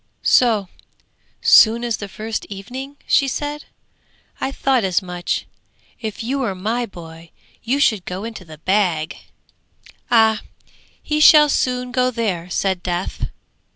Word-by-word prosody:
'So 220 -6 +3 0.8
soon 230 +1 +6
as 235 -2 -1
the 205 - -6
first 215 +2 -5
evening!' 255 +8 -8
she 275 - +3
said. 290 +3 -4 0.7
'I 270 - -2
thought 265 -4 +1
as 185 -2 +2
much; 180 -2 -3 0.5
if 220 -1 -5
you 265 +4 -2
were 220 -8 -1
my 225 +6 -2
boy, 165 -3 -12 0.3
you 260 +5 0
should 215 -9 +2
go 185 +3 -5
into 225 -4 -7
the 160 -3 -12
bag!' 175 -3 0 0.9
'Ah, 220 -2 +4 0.6
he 300 0 -1
shall 300 -1 +8
soon 250 -2 0
go 255 0 +2
there!' 200 -8 -2
said 190 0 -1
Death. 180 0 -3
220 Hz, 135 wpm, -20 LUFS, 185-250 Hz, 0.9 s, shall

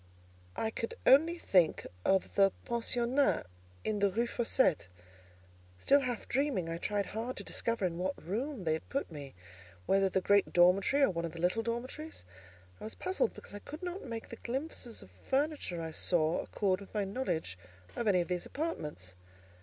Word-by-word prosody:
I 220 - -1
could 230 - -4
only 325 +6 +6
think 180 - +3 0.2
of 190 -1 +2
the 195 -1 +5
pensionnat 240 - +1 0.4
in 215 -1 -1
the 200 0 +4
Rue 230 +5 +1
Fossette. 230 - +1 0.9
Still 280 - +5
half 245 -4 -3
dreaming, 260 - 0
I 165 0 -3
tried 205 +2 0
hard 230 +4 -4
to - - -4
discover 230 -4 0
in 170 -1 -2
what 185 +1 -1
room 235 - -3
they 160 -2 +2
had 160 - -5
put 275 -8 -2
me; 145 - -8 0.5
whether 195 - +3
the 190 - +2
great 200 +1 +3
dormitory, 185 +10 +5
or 270 - +5
one 170 -1 -3
of 165 - -5
the 165 - -8
little 180 +6 +2
dormitories. 240 - -5 0.5
I - - -7
was 220 - -5
puzzled, 375 +6 0
because - - -11
I 205 - -6
could 305 - -9
not 360 +2 -4
make 230 -3 -6
the 230 - -7
glimpses 250 -2 -4
of 95 - -16
furniture 270 - -1
I 160 - -4
saw 160 0 +2
accord 195 -2 0
with 200 - -13
my 210 - +2
knowledge 185 - -2 0.4
of 235 - -2
any 185 -3 +4
of 170 - -3
these 180 -1 -2
apartments. 150 - -4
210 Hz, 180 wpm, -32 LUFS, 180-260 Hz, 0.9 s, only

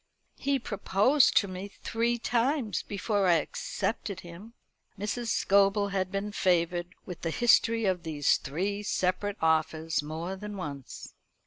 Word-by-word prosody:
He 280 0 +1
proposed 230 +4 +2
to 200 - +4
me 185 +1 -6 0.2
three 235 +1 0
times 240 0 0
before 205 -1 -1
I 175 - +6
accepted 190 +5 -3
him." 180 +7 -11 0.4
Mrs. 210 +4 -3
Scobel 200 -1 +3
had 190 -1 -1
been 200 +1 -3
favoured 175 -2 0
with 180 -3 -8
the 165 - -1
history 230 +3 +3
of 185 -2 +1
these 155 -4 +2
three 195 +8 -3
separate 200 +1 -1
offers 160 0 +1
more 160 +5 -5
than 210 +1 -7
once. 140 -7 -7
195 Hz, 135 wpm, -29 LUFS, 175-210 Hz, 0.4 s, I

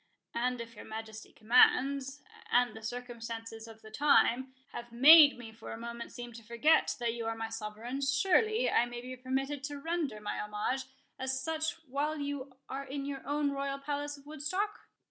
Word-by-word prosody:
"And 250 +1 0
if 230 0 -7
your - - -9
Majesty's 220 0 -8
commands, 270 +4 +3 0.3
and 245 -2 +3
the 220 - -9
circumstances 230 -1 -6
of 225 -1 -13
the 220 - -12
time, 260 -1 +3 0.2
have 240 0 -8
made 290 +4 +9
me 235 -2 -9
for 220 - -9
a - - -6
moment 235 0 -7
seem 240 0 -8
to 230 0 -11
forget 235 +8 +3
that 235 -1 0
you 230 -1 -4
are 225 - -1
my 225 0 -4
sovereign, 225 +4 -5
surely 390 - +3
I 240 - +3
may 240 0 -6
be 255 +1 -7
permitted 265 +2 -2
to 290 0 -5
render 310 -6 -2
my 210 0 -4
homage 210 +6 -2 0.3
as 260 0 -1
such 320 +3 -1
while 290 +4 -1
you 280 -2 -5
are 275 +1 -4
in 275 +1 -5
your 275 -1 -4
own 290 0 +1
royal 275 0 -2
palace 290 +1 -4
of 280 - -18
Woodstock?" 310 +8 -3
260 Hz, 185 wpm, -32 LUFS, 230-285 Hz, 0.3 s, made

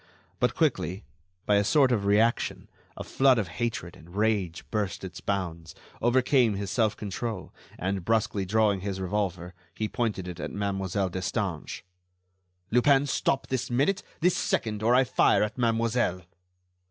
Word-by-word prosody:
But - - +1
quickly, 90 +7 0 0.4
by 105 - +4
a 100 - +3
sort 135 +4 +4
of 105 -5 +1
reaction, 110 +3 +2 0.3
a - - -5
flood 135 -2 +3
of 105 -6 -1
hatred 120 -7 -2
and 85 +4 -15
rage 105 -5 0
burst 105 -4 -2
its 95 -1 -7
bounds, 85 -4 -3 0.3
overcame 125 -2 +3
his 100 0 -4
self 110 -4 +1
control, 105 0 -5 0.2
and, 95 +1 -2
brusquely 105 -1 +1
drawing 105 0 +2
his 95 0 -4
revolver, 90 -2 -2 0.2
he 110 - -1
pointed 105 -6 -2
it 90 -2 -7
at - - -4
Mademoiselle 95 -1 -1
Destange. 95 -2 -3 0.9
"Lupin, 135 +4 +4
stop, 135 0 0
this 130 -2 -2
minute, 145 +11 +1 0.2
this 180 +1 +3
second, 105 -2 -1
or 120 +3 +4
I 130 - +6
fire 125 -4 +3
at 105 - -3
mademoiselle." 115 -5 0
105 Hz, 150 wpm, -27 LUFS, 95-120 Hz, 0.9 s, I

